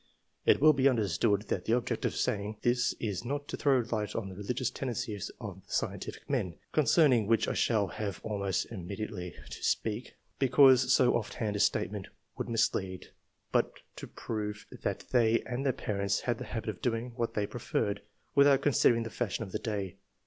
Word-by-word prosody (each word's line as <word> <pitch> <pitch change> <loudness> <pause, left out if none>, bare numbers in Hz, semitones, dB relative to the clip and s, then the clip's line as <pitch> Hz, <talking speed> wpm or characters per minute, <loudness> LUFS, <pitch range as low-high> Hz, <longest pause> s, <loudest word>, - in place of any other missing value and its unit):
It - - +6
will 155 +2 +7
be 140 -1 +4
understood 105 -3 +1
that 90 - -1
the 115 - +3
object 125 - -2
of - - 0
saying 105 +1 -1
this 120 0 +2
is 105 -2 -3
not 145 +3 -3
to - - -2
throw 135 -4 +3
light 105 -2 -2
on 105 -4 -3
the 95 - -9
religious 120 +5 -2
tendencies 120 -6 -3
of 100 -5 -8
the - - -19
scientific - - -3
men 90 -2 -1 0.2
(concerning 140 - +4
which 115 0 +3
I - - 0
shall 110 -3 +2
have 100 -4 -4
almost 100 -3 -1
imme 95 -2 -6
diately 90 -5 -5
to - - -9
speak), 110 +3 -1 0.2
because 130 -1 +6
so 125 -1 +5
ofF 115 -3 -2
hand 105 -3 -2
a - - -1
statement - - 0 0.3
would - - -4
mislead, 95 -5 -1 0.4
but - - +2 0.2
to - - -7
prove 105 -2 -5 0.2
that - - -2
they 115 -2 +4
and 125 +2 -4
their 135 - +3
parents 100 -5 -1
had 120 -2 -1
the - - -5
habit 110 -2 -4
of 100 - -15
doing 120 0 -1
what 115 -1 -2
they 105 - +1
preferred, 105 -2 -2 0.3
without 140 -1 +5
considering 120 -4 +4
the 115 - -6
fashion 115 -2 -2
of 95 - -9
the 105 - -2
day. 100 -4 -3
115 Hz, 190 wpm, -31 LUFS, 100-125 Hz, 0.4 s, will